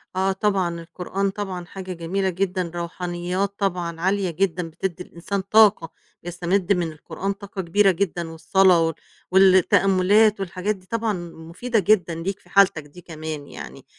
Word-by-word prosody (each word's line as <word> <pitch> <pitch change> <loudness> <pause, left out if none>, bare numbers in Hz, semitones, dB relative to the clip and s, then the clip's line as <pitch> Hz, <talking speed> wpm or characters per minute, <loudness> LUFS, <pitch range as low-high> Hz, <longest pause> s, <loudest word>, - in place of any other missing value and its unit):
آه 190 +1 +1
طبعًا. 190 -4 0
القرآن 180 +4 -3
طبعًا 190 -3 -5
حاجة 185 +1 -7
جميلة 185 +3 -2
جدًا 185 -1 -2
روحانيّات 175 +3 -3
طبعًا 175 -4 -2
عالية 190 0 +1
جدًا 175 0 -1
بتدّي 180 +2 -4
الإنسان 185 +3 -4
طاقة 200 -4 +4 0.3
يستمد 175 +2 0
من 175 -3 -1
القرآن 160 +5 -4
طاقة 200 0 -7
كبيرة 195 +3 +3
جدًا 175 -2 -2
والصلاة 180 +2 +3
وال 165 - -3 0.4
والتأمُّلات 195 +2 +4
والحاجات 195 +2 -2
دي 185 -1 -19
طبعًا 225 +1 -1 0.2
مفيدة 170 +9 -3
جدًا 180 -3 +2
ليك 185 +4 -4
في - - -24
حالتك 195 -5 +4
دي 145 +5 -15
كمان 155 -3 -7
يعني، - - -10
185 Hz, 145 wpm, -23 LUFS, 170-195 Hz, 0.4 s, طاقة